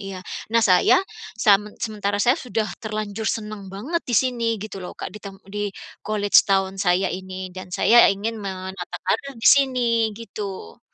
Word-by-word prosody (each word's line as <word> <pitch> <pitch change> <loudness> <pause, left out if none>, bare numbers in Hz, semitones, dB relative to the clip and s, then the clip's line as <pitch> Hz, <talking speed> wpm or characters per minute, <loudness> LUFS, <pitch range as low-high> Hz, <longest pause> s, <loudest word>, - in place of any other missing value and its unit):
iya. 190 -1 -7 0.3
Nah 230 - +5
saya 185 - +5 0.3
samen 210 -1 +3
sementara 205 -2 -2
saya 250 +8 +3
sudah 220 - -2
terlanjur 215 0 -4
senang 215 -3 -3
banget 210 - -3
di 245 - -1
sini 245 0 +1 0.2
gitu 215 -2 -7
loh 180 -1 -8
Kak, - - -6
di 210 - -10
tem 200 -1 -9 0.2
di 205 0 -2 0.4
college 205 -1 +4
town 195 -1 +1
saya 185 0 +2
ini 185 0 -6
dan 185 0 -9
saya 235 +1 +6
ingin 220 +3 -4
menata 190 -3 -6
karier 245 +9 -1
di - - +7
sini 240 -5 +1
gitu. 200 - -7
205 Hz, 165 wpm, -23 LUFS, 190-225 Hz, 0.4 s, di